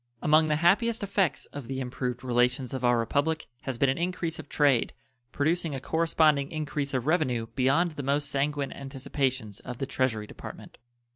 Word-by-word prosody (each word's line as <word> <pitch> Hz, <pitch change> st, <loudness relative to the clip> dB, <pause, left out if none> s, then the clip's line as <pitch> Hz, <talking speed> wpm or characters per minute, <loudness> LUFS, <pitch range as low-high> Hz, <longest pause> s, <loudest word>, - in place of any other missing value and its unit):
Among 155 Hz, +3 st, +4 dB
the 150 Hz, -, +2 dB
happiest 205 Hz, +8 st, +3 dB
effects 195 Hz, -8 st, 0 dB
of 140 Hz, -4 st, -7 dB
the 135 Hz, 0 st, -3 dB
improved 125 Hz, -1 st, -3 dB
relations 125 Hz, +1 st, +1 dB
of 130 Hz, -1 st, -4 dB
our 120 Hz, -1 st, +4 dB
Republic 145 Hz, +8 st, 0 dB, 0.2 s
has 130 Hz, -3 st, -4 dB
been 140 Hz, -, +3 dB
an 130 Hz, +3 st, 0 dB
increase 175 Hz, -2 st, -2 dB
of 155 Hz, -, -9 dB
trade, 140 Hz, -5 st, +2 dB, 0.4 s
producing 160 Hz, +1 st, 0 dB
a -, -, -3 dB
corresponding 155 Hz, -1 st, +2 dB
increase 145 Hz, -3 st, -3 dB
of 130 Hz, -1 st, -1 dB
revenue 140 Hz, -8 st, +1 dB
beyond 140 Hz, +7 st, +2 dB
the 150 Hz, -, -6 dB
most 140 Hz, +1 st, 0 dB
sanguine 140 Hz, 0 st, -1 dB
anticipations 135 Hz, -5 st, -3 dB
of 125 Hz, -, -7 dB
the 135 Hz, -, -2 dB
Treasury 130 Hz, -5 st, -1 dB
Department. -, -, -11 dB
140 Hz, 170 wpm, -28 LUFS, 130-155 Hz, 0.4 s, Among